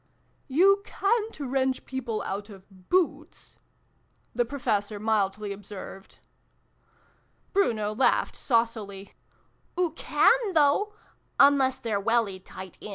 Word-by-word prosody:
"You 390 +8 +4
ca'n't 435 0 -1
wrench 265 -1 -1
people 245 -5 -4
out 200 +2 -5
of 190 -2 -16
boots" 320 -4 -1 0.7
the 240 +1 +1
Professor 215 -5 -2
mildly 210 -1 0
observed. 195 -1 -10 1.4
Bruno 220 - +1
laughed 250 +5 +2
saucily. 220 -5 -1 0.3
" - - -15
Oo 355 -3 +2
can, 440 +6 +2
though! 315 +8 +3 0.4
Unless 275 -2 +5
they're 215 -3 -1
welly 215 -2 0
tight 190 -1 -11
in." - - -8
235 Hz, 105 wpm, -27 LUFS, 205-295 Hz, 1.4 s, Unless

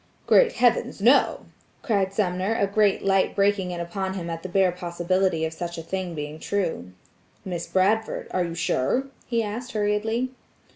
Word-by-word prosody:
"Great 485 -2 +5
heavens! 240 -3 +2
No!" 240 +7 +4 0.4
cried 200 -6 +1
Sumner 195 +1 0
a 200 - +2
great 200 0 +2
light 195 -1 +2
breaking 200 -2 +2
in 175 -1 -4
upon 190 +3 -3
him 170 -3 -4
at 165 0 -5
the 185 - -6
bare 190 -1 +3
possibility 175 -1 0
of 160 - -4
such 170 +1 -5
a 165 - -5
thing 185 0 -4
being 150 +1 -6
true. 170 - -2 0.5
"Miss 175 -3 -4
Bradford, 210 +4 +1
are 185 - +1
you 170 -1 -4
sure?" 245 - 0 0.2
he 230 -2 0
asked 235 +5 -5
hurriedly. 220 +4 0
190 Hz, 165 wpm, -25 LUFS, 175-210 Hz, 0.5 s, Great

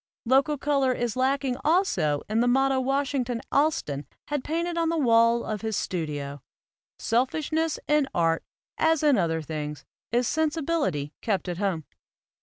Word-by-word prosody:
Local 270 +5 +3
color 275 -2 +1
is 240 -3 -2
lacking 265 0 0
also 240 - +2
in 215 +2 0
the 240 - +3
motto 270 +1 +3
Wash 270 +2 0
ington 245 -3 -1
Allston 215 - +1 0.2
had 290 -3 -1
painted 335 +2 -2
on 335 -1 +1
the 335 - 0
wall 235 -3 +4
of 215 -2 -4
his 220 -2 -2
studio: 145 -5 -3 0.6
"Selfishness 310 +7 0
in 300 -2 +3
art, 165 -1 +1 0.4
as 320 -1 +3
in 295 -3 +5
other 165 -5 0
things, 150 -2 -5 0.3
is 240 +1 +2
sensibility 300 - -1
kept 200 -4 -1
at 175 0 -3
home." 190 -6 -1
250 Hz, 150 wpm, -26 LUFS, 180-295 Hz, 0.6 s, in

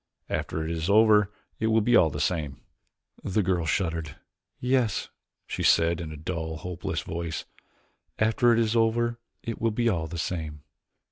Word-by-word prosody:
After 80 - -2
it 80 - -3
is 80 +2 -2
over 105 -1 +5 0.3
it 110 - +1
will 110 0 +4
be 120 +3 +3
all 80 -8 +6
the - - -5
same." 75 -6 -1 0.6
The 100 +2 +1
girl 90 -3 0
shuddered. 80 -4 -1 0.4
"Yes," 125 -4 +1 0.4
she - - -4
said 85 +1 +4
in 80 -2 -6
a 80 - -7
dull, 80 0 -4
hopeless 90 +2 -4
voice, 85 -1 -4 0.7
"after 115 +2 +3
it 115 - +4
is 115 0 +2
over 115 +1 +2 0.2
it 115 - -5
will 115 - +3
be 115 +2 +1
all 80 -6 -1
the 85 +2 -6
same." 80 -4 -4
90 Hz, 165 wpm, -27 LUFS, 80-110 Hz, 0.7 s, all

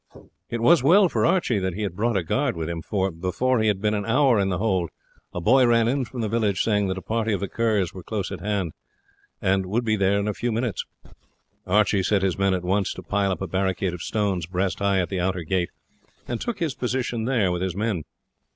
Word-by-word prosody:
It 120 -1 -3
was 165 +6 +5
well 180 +7 +5
for - - +1
Archie 170 - +2
that 95 -2 -2
he 105 - -3
had 95 -4 -3
brought 115 +2 +1
a 95 - 0
guard 80 - 0
with 80 -1 -3
him, 85 -1 -4
for 95 +1 -1
before 95 +10 0
he 110 - +2
had 105 -3 +1
been 105 +1 0
an 105 -1 -1
hour 125 +1 +3
in 95 -1 +1
the 90 - -1
hold 95 -5 0 0.4
a - - -4
boy 125 +8 +4
ran 115 -1 +4
in 130 +1 0
from 120 +2 -6
the 110 - 0
village 105 -3 +1
saying 105 -3 +1
that 95 0 -2
a 95 - -7
party 115 -1 -1
of 100 - 0
the 100 - -3
Kerrs 105 -5 0
was 95 - -9
close 100 -2 -3
at 95 - -5
hand, 100 -4 -2 0.7
and 95 0 +1
would 115 +5 -1
be 110 -1 +2
there 100 0 +2
in 100 - -2
a 105 - 0
few 120 +3 -2
minutes. 115 -4 -2 0.8
Archie 100 0 +3
set 95 +1 +1
his 95 -2 +1
men 95 -1 +2
at 90 - -4
once 95 +2 +1
to - - -8
pile 100 -1 0
up 95 - -3
a - - -3
barricade 95 0 -1
of 90 - -7
stones 100 -6 -1
breast 90 +1 -1
high 100 -1 +2
at 90 - -1
the 95 - -2
outer 90 0 -1
gate, 90 +1 0 0.6
and 120 -2 -3
took 240 - -3
his 165 -6 -1
position 125 -3 -2
there 115 -8 +2
with 90 0 -2
his 95 -2 -2
men. 105 -4 -1
100 Hz, 245 wpm, -24 LUFS, 95-115 Hz, 0.8 s, was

